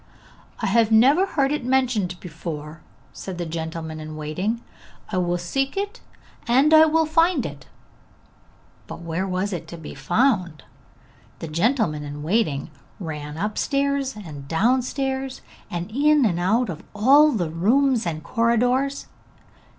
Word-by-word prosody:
'I - - 0
have 225 +2 +3
never 275 - +5
heard 275 -6 +1
it 300 -3 -1
mentioned 240 -9 0
before,' 160 -2 -7 0.3
said 190 -2 -7
the 175 - -3
gentleman 160 -1 -5
in 155 0 -7
waiting. 180 +10 -2 0.5
'I 185 - -1
will 175 -1 +1
seek 270 - -2
it, 410 +4 -3 0.5
and 270 +6 +4
I 315 0 +9
will 320 +1 +2
find 330 -2 +2
it!' 140 -3 -8 1.2
But - - -8
where 170 +3 -3
was 190 +2 -2
it 175 - -5
to 170 - -8
be 160 - -9
found? 175 - 0 0.7
The 165 - -6
gentleman 170 - +1
in 145 0 -7
waiting 160 -5 0 0.3
ran 150 -4 -6
upstairs 275 +7 -1
and 150 -9 -9
downstairs 260 - 0 0.3
and 175 +3 -5
in 290 +2 +4
and 175 -5 +1
out 215 +6 +1
of 160 -3 -6
all 280 +8 +6
the 175 -7 -1
rooms 235 - +2
and 155 -2 -4
corridors. 245 +6 +1
210 Hz, 140 wpm, -23 LUFS, 165-270 Hz, 1.2 s, I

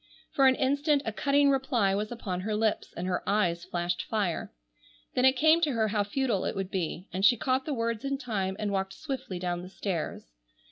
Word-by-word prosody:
For 270 -1 +4
an 260 - +5
instant 285 +2 +2
a 225 - -2
cutting 280 +3 +3
reply 250 -7 +1
was 210 +3 -2
upon 200 -6 -4
her 210 +2 -2
lips 220 0 0
and 175 - -3
her 185 -1 -1
eyes 175 -5 +1
flashed 175 0 -2
fire; 205 -6 -1 0.6
then 250 - +2
it 265 - +7
came 315 +5 +4
to 300 -5 +2
her 220 -2 +1
how 205 -1 +1
futile 215 -1 0
it - - -2
would 195 -1 -3
be, 180 0 -3
and 190 +1 -2
she 240 +4 +6
caught 260 +3 0
the 300 - -2
words 230 -2 -2
in 275 0 -1
time 205 -8 -2
and 210 -1 -2
walked 195 -1 -1
swiftly 265 -8 -5
down 175 -1 -2
the 180 - -9
stairs. 175 - -4
215 Hz, 215 wpm, -29 LUFS, 190-265 Hz, 0.6 s, it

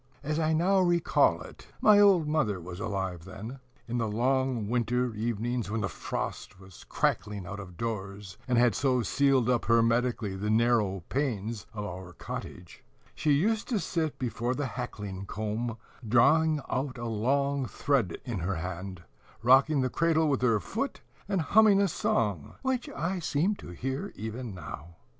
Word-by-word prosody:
As 155 +2 -1
I 160 -1 +2
now 180 +5 +3
recall 175 -2 +3
it, - - -13
my 210 -1 +6
old 190 -6 +5
mother 135 -11 +1
was 90 +1 -8
alive 95 -5 -3
then, 110 +7 -8 0.3
in 120 +1 -2
the 115 - 0
long 125 0 0
winter 125 +1 0
evenings 115 +1 -2
when 110 +1 -1
the 100 - 0
frost 90 - -5
was 95 -2 -14
crackling 105 -3 -1
out 100 +3 -6
of 90 -4 -10
doors, 100 -4 -5
and 125 -2 +2
had 120 -2 +5
so 130 -1 +1
sealed 135 +3 +2
up 125 -2 +1
hermetically 115 -2 +2
the 105 +2 -3
narrow 110 -5 +2
panes 115 -6 -2
of 105 -1 -5
our 90 -2 -7
cottage, 90 0 -8 0.3
she 155 - -1
used 210 +9 +1
to 230 -5 0
sit 160 -3 -2
before 125 0 -2
the 145 - -2
hackling 100 -2 -5
comb, 110 +3 -3 0.3
drawing 155 +7 +4
out 130 0 -2
a 120 - -5
long 135 +5 0
thread 115 -3 0
in 115 -6 -3
her 90 +3 -1
hand, 90 +1 -5 0.4
rocking 135 +4 +5
the 130 - +1
cradle 160 -1 +2
with 140 -4 +1
her 115 -4 +3
foot, 90 - -4 0.3
and 195 -4 +1
humming 205 +4 +5
a 200 - +4
song, 105 - -1
which 260 -2 -1
I 180 +4 -2
seem 165 +4 +1
to - - -10
hear 135 - -4
even 110 0 -5
now. 85 -1 -9
120 Hz, 165 wpm, -29 LUFS, 100-145 Hz, 0.4 s, my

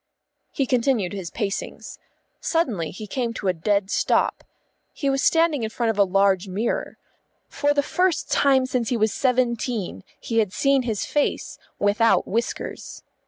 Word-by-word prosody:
He 275 - 0
continued 240 -6 +1
his 190 -4 -5
pacings. 205 -1 -5 0.4
Suddenly 235 - 0
he 215 +4 -8
came 235 +2 -3
to 200 - -4
a 185 - +3
dead 200 +4 0
stop. - - +1 0.5
He 280 -2 -1
was 270 0 0
standing 325 -4 +3
in 220 - -2
front 230 0 0
of 210 - -6
a - - +8
large 195 0 +2
mirror. 200 +5 -2 0.5
For 290 0 0
the 290 0 +2
first 360 +1 0
time 270 -2 +4
since 250 -3 -1
he 245 - 0
was 215 -1 +1
seventeen 235 - -1 0.2
he 230 -1 -1
had 210 -3 0
seen 275 -1 +3
his 225 -5 -2
face 295 - -1 0.2
without 210 +3 +2
whiskers. 230 +4 -4
230 Hz, 160 wpm, -23 LUFS, 200-270 Hz, 0.5 s, a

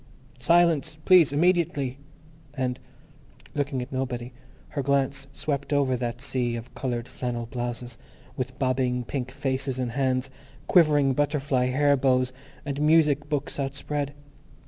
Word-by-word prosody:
"Silence, 165 +1 +3
please! 180 -6 +7
Immediately!" 145 -5 +1 0.6
and, 130 -2 -1 0.7
looking 140 -3 -1
at 125 - -11
nobody, 125 -2 -3 0.4
her 145 - -2
glance 140 0 0
swept 140 0 -3
over 140 -3 +2
that 120 0 -4
sea 125 -3 -1
of 115 +2 -8
coloured 120 -3 -3
flannel 120 -2 -4
blouses, 120 -1 -5 0.4
with 130 0 -4
bobbing 130 -1 0
pink 130 +1 -4
faces 130 0 -2
and 125 -2 -2
hands, 130 0 0 0.3
quivering 150 -6 +4
butterfly 140 -2 +1
hair 140 +2 +3
bows, 130 -1 +2 0.3
and 140 0 -3
music 150 -2 +4
books 145 -1 -2
outspread. 140 +1 -3
135 Hz, 125 wpm, -26 LUFS, 125-145 Hz, 0.7 s, please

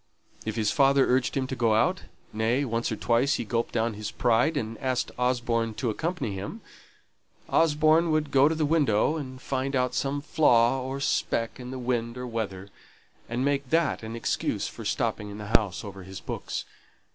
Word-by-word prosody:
If 110 - -2
his 110 -3 +1
father 140 -1 +4
urged 130 +2 +1
him 135 - 0
to 130 - -4
go 115 -3 +2
out 110 - +1 0.3
nay, 115 +6 +1
once 115 -1 -1
or - - 0
twice 120 +5 +2
he - - -3
gulped 115 +1 -1
down 115 0 0
his 105 0 -5
pride, 120 +6 +2
and 115 -4 -3
asked 130 -1 -1
Osborne 120 -3 0
to 120 -1 -1
accompany 160 - -2
him 95 +1 -6 0.9
Osborne 155 +1 +3
would 155 -2 0
go 140 +2 +5
to 160 - -1
the 155 -1 +1
window 145 -3 +2
and 130 -3 -7
find 135 +1 -2
out 125 -1 +1
some 140 +1 -1
flaw 130 -4 +3
or 135 +2 -4
speck 115 -4 -1
in 125 0 -7
the 130 - -5
wind 120 -1 -2
or 125 - -4
weather, 100 -5 -4 0.6
and 120 +3 -1
make 140 -2 0
that 165 0 +2
an 110 +1 -6
excuse 115 - -1
for - - -9
stopping 105 -1 -1
in 100 - -8
doors 105 -2 +1
over 100 -2 -8
his 95 0 -8
books. - - -5
125 Hz, 185 wpm, -27 LUFS, 115-140 Hz, 0.9 s, go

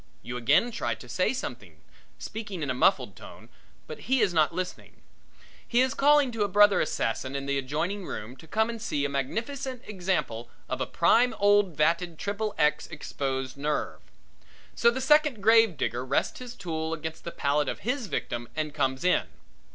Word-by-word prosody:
You 125 - -6
again 145 - +3
try 120 - -2
to 110 +3 -13
say 120 +10 +1
something, 105 - -6 0.4
speaking 205 - -6
in 140 - -1
a - - 0
muffled 130 +9 +2
tone, - - -13 0.4
but - - -8
he 265 0 +4
is 205 -5 +2
not 155 -1 +3
listening. 180 +1 -6 0.6
He 240 +1 +3
is 260 0 +2
calling 290 -2 +4
to 225 -2 -4
a 205 - +3
brother 205 +1 +5
assassin 130 -2 -2
in 140 0 -3
the 140 0 0
adjoining 165 +9 -3
room 110 +5 -6
to 160 - -14
come 220 +6 +1
and 230 -1 -6
see 145 -10 -1
a - - -1
magnificent 235 - -3
example 180 - -2 0.2
of - - -3
a - - -1
prime 245 +2 +3
old 205 -4 +3
vatted 170 +2 +1
triple 205 +3 -3
X 150 0 +2
exposed 135 -4 -4
nerve. 150 +2 -2 0.7
So 235 - +4
the 255 +3 -2
Second 300 -3 +4
Grave 225 -4 +5
Digger 120 0 -2
rests 130 +1 -1
his 250 -1 -8
tools 160 -3 -3
against 160 +1 -7
the - - -4
palate 145 0 0
of - - -5
his 250 +1 -2
victim 120 -8 -4
and 155 -1 -2
comes 135 -2 -1
in. 180 - +2
170 Hz, 180 wpm, -27 LUFS, 140-225 Hz, 0.7 s, brother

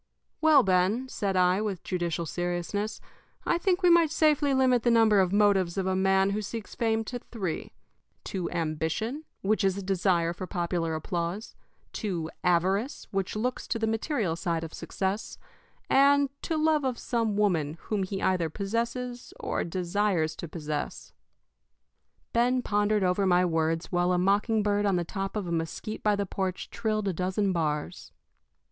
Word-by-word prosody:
"Well, 310 -4 +6
Ben," 190 +7 +2
said 200 -6 -2
I, 180 +2 +3
with 205 -4 -3
judicial 170 -2 -2
seriousness, 175 +5 -3 0.5
"I 340 - +1
think 370 0 +1
we 355 - +6
might 335 -2 +5
safely 300 -2 +3
limit 260 -2 +3
the 240 - +2
number 225 -3 +5
of 185 -2 +2
motives 200 -3 +3
of 190 - 0
a 190 0 +1
man 190 +1 +3
who 210 +2 -1
seeks 215 +1 -6
fame 225 -2 0
to 245 +2 -5
three 195 -9 -5 0.5
to 185 -3 -3
ambition, 165 - -2 0.2
which 215 +2 +1
is 195 0 +2
a 200 - -4
desire 180 -3 +1
for 185 +1 -6
popular 170 -2 -1
applause; 170 +5 -3 0.4
to 170 -7 -3
avarice, 190 - +1
which 195 0 -2
looks 245 +4 -2
to - - -1
the 225 - 0
material 220 - -1
side 165 -1 -2
of 160 - -7
success; 195 +2 -3 0.5
and 280 0 +5
to 320 - -2
love 310 -1 +2
of 255 -3 -1
some 225 -4 -1
woman 165 -7 +1
whom 210 -2 -2
he 190 +1 -3
either 180 -3 +1
possesses 235 - -3
or - - -2
desires 175 -2 0
to 170 - -6
possess." 150 -2 -5 1.2
Ben 245 +2 +2
pondered 205 0 +1
over 185 +2 +2
my 180 0 +4
words 165 0 0
while 175 0 +2
a - - +2
mocking 205 +4 +2
bird 205 0 +1
on 195 - +2
the 175 -1 0
top 195 +3 -4
of 210 -3 -2
a 170 - -4
mesquite 165 +6 -3
by 210 -1 +2
the 200 0 -1
porch 185 -1 -3
trilled 215 -2 -1
a 190 - 0
dozen 185 +3 0
bars. 150 -3 -2
195 Hz, 165 wpm, -28 LUFS, 175-225 Hz, 1.2 s, Well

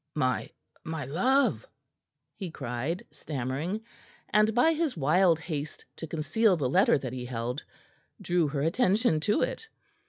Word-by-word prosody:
"My 130 -4 0 0.3
my 160 -3 -4
love!" 255 - +2 0.7
he 190 -4 -5
cried, 140 - -4
stammering, 145 - -3 0.5
and 215 +1 +4
by 320 +7 +5
his 315 - -1
wild 165 +4 +4
haste 155 -3 -5
to 165 - -6
conceal 180 +6 +2
the 140 -5 0
letter 195 - +4
that 130 -3 -5
he 125 -1 -5
held, 125 +3 -3 0.6
drew 175 -4 +1
her 140 -1 -2
attention 195 +1 +2
to 205 +7 +1
it. 450 - -3
165 Hz, 135 wpm, -28 LUFS, 140-210 Hz, 0.7 s, by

